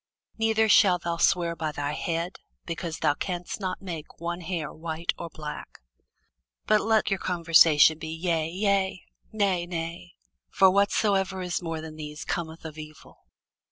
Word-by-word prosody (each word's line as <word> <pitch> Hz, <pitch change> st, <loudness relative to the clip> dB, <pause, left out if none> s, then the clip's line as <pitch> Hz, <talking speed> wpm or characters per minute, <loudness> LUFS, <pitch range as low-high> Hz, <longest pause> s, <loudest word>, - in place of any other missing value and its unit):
Neither 220 Hz, 0 st, +3 dB
shalt 185 Hz, -4 st, +5 dB
thou 170 Hz, 0 st, -2 dB
swear 170 Hz, 0 st, +2 dB
by 155 Hz, -2 st, -3 dB
thy 145 Hz, -1 st, -3 dB
head, 170 Hz, +3 st, -3 dB, 0.3 s
because 165 Hz, -1 st, -4 dB
thou -, -, +2 dB
canst 175 Hz, +4 st, -4 dB
not 185 Hz, -1 st, -4 dB
make 165 Hz, -5 st, -7 dB
one 170 Hz, +1 st, -4 dB
hair 165 Hz, -2 st, -4 dB
white 165 Hz, +1 st, -3 dB
or 170 Hz, -, -5 dB
black. 150 Hz, -2 st, -8 dB, 0.9 s
But 215 Hz, 0 st, +4 dB
let 220 Hz, -1 st, +2 dB
your 195 Hz, -, +1 dB
communication 165 Hz, -3 st, +5 dB
be, 160 Hz, -, -6 dB
Yea, 165 Hz, -1 st, -1 dB
yea; 190 Hz, 0 st, 0 dB, 0.3 s
Nay, 195 Hz, -5 st, 0 dB
nay: 170 Hz, +1 st, -5 dB, 0.3 s
for 190 Hz, -1 st, +5 dB
whatsoever 195 Hz, -1 st, +1 dB
is 180 Hz, 0 st, -2 dB
more 165 Hz, -2 st, -4 dB
than 155 Hz, -1 st, -9 dB
these 150 Hz, -1 st, -7 dB
cometh 165 Hz, -1 st, -4 dB
of 155 Hz, -1 st, -8 dB
evil. 155 Hz, 0 st, -13 dB
170 Hz, 155 wpm, -27 LUFS, 160-190 Hz, 0.9 s, shalt